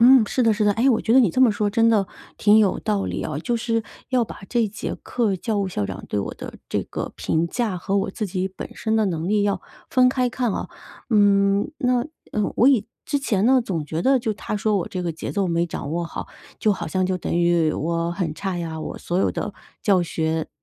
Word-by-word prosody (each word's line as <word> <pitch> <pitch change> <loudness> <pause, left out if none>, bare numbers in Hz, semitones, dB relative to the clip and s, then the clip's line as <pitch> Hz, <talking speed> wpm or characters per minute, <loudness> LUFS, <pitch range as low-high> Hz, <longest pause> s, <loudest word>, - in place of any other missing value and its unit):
嗯， 245 -1 +8
是 255 - 0
的， 225 -2 +4
是 215 0 0
的。 205 - +4
哎， 230 +6 +2
我 230 - +2
觉 225 - +1
得 265 - +7
你 220 -9 +4
这 255 - 0
么 255 -3 +7
说 205 0 0
真 230 +1 +3
的 210 -4 +3 0.3
挺 210 +1 +5
有 205 -4 +3
道 210 -3 0
理 - - -3
哦， 155 -2 -3
就 235 +9 -1
是 230 -1 0 0.3
要 250 -3 +2
把 - - -10
这 235 -2 +2
节 210 +1 -5
课， 220 -6 0
教 215 +3 -2
务 195 -1 0
校 105 - -2
长 95 -1 -7
对 105 - -1
我 100 - -3
的 - - -8
这 - - -1
个 - - -5
评 160 +1 0
价， 215 +1 -1
和 195 +3 -1
我 195 - 0
自 215 +2 -3
己 185 0 -2
本 190 - -8
身 220 -1 -1
的 220 - +3
能 165 -1 -2
力 210 0 +2
要 205 -1 0 0.3
分 255 -1 +5
开 255 -1 +1
看 245 -1 -1
哦。 - - -3 0.4
嗯， 200 +2 +4
那 250 -3 +2 0.3
呃， 210 -1 0
我 240 - +5
以 235 -7 +3 0.2
之 285 - 0
前 215 -8 0
呢， 260 +1 +5
总 170 -8 -2
觉 160 +2 -3
得 265 0 +4
就 225 -2 -1
他 210 0 -4
说 210 0 +1
我 175 - -3
这 185 - -4
个 170 -2 -2
节 160 - -6
奏 200 -2 0
没 170 0 +1
掌 145 -3 -5
握 170 +2 -1
好， 170 - -6 0.3
就 215 - +3
好 195 - -4
像 185 -1 0
就 185 - 0
等 - - -4
于 170 -2 +3
我 170 +2 -1
很 170 -3 -2
差 190 +1 -3
呀， 160 -2 -4
我 - - -6
所 175 - -3
有 - - +2
的 210 - -4 0.3
教 190 -4 +4
学 160 -1 -1
200 Hz, 265 characters per minute, -23 LUFS, 175-230 Hz, 0.4 s, 嗯